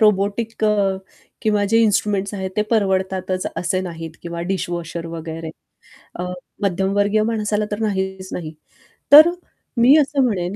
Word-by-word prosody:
Robotic 215 +2 +1
अ, 215 - +4 0.7
किंवा 210 -2 +2
जे 225 - +4
instruments 205 -1 +1
आहेत 190 -1 -4
ते 210 - +3
परवडतातच 190 -3 0
असे 185 +1 0
नाहीत 165 -3 -6
किंवा 170 0 -5
डिशवॉशर 170 -3 -3
वगैरे 165 -1 -6 0.7
अ, - - -2 0.4
मध्यमवर्गीय 200 +2 +1
माणसाला 215 -1 0
तर 205 - -3
नाहीच 190 -3 -2
नाही. 160 -3 -5 0.6
तर 305 +4 +10 0.5
मी 255 +5 +7
असं 285 -2 +2
म्हणेन, 195 -6 -1
195 Hz, 130 wpm, -20 LUFS, 180-215 Hz, 0.7 s, तर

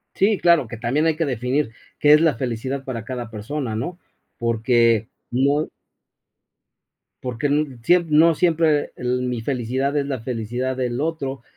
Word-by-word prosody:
Sí, 200 +1 +3
claro, 170 -8 +4
que 115 - -7
también 125 +8 0
hay 160 -2 +2
que 165 - 0
definir 125 0 -1 0.3
qué 150 0 +5
es 150 - +7
la 160 -3 +3
felicidad 130 +2 -3
para 120 -5 -5
cada 120 -2 -5
persona, 115 +2 -4
¿no? 170 +11 -4 0.4
Porque, 115 -1 +2 0.2
no 140 +5 +1 1.6
porque 125 +3 -2
n 145 -3 0
siemp 175 0 +3
no 160 +2 +5
siempre, 165 0 +2 0.2
eh, - - -14
l 125 0 -1
mi 125 -2 -2
felicidad 130 +3 -1
es 140 -1 0
la 135 -2 -2
felicidad 120 +2 -3
del 125 -1 -2
otro 140 -5 -3
130 Hz, 160 wpm, -22 LUFS, 120-150 Hz, 1.6 s, es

